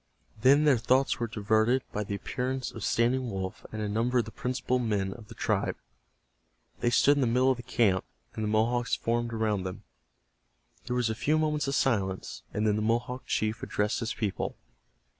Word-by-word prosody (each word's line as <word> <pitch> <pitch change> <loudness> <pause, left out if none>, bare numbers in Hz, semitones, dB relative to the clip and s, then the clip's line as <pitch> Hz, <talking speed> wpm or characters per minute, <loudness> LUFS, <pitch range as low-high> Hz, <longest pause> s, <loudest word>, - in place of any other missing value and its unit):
Then 140 +5 +6
their 140 -5 +4
thoughts 130 +4 +2
were 120 - -1
diverted 110 +4 +2
by 105 - -2
the 100 0 -4
appearance 130 +4 -3
of 115 - -8
Standing 125 +2 +1
Wolf 95 -2 -5
and 110 -1 -4
a - - -1
number 115 +4 +1
of 120 - +2
the 110 - -8
principal 125 +1 -1
men 100 -5 0
of 110 -1 -13
the - - -12
tribe. - - 0 1.0
They 120 - +2
stood 145 +4 +4
in - - +2
the 125 - +3
middle 125 +3 +3
of 130 - 0
the - - -6
camp, 115 -6 +2 0.3
and 110 - -4
the - - 0
Mohawks 115 +3 +1
formed 120 0 -1
around 110 -3 0
them. 90 0 -6 1.0
There 125 - -1
was 120 -2 +1
a - - 0
few 150 +7 +1
moments 150 -2 0
of 140 - 0
silence, 95 -9 0
and 105 - -1
then 105 -1 +2
the - - -1
Mohawk 120 +4 -1
chief 110 +1 -1
addressed 105 +1 -1
his 115 0 -3
people. 105 -4 -2
115 Hz, 195 wpm, -29 LUFS, 105-125 Hz, 1.0 s, Then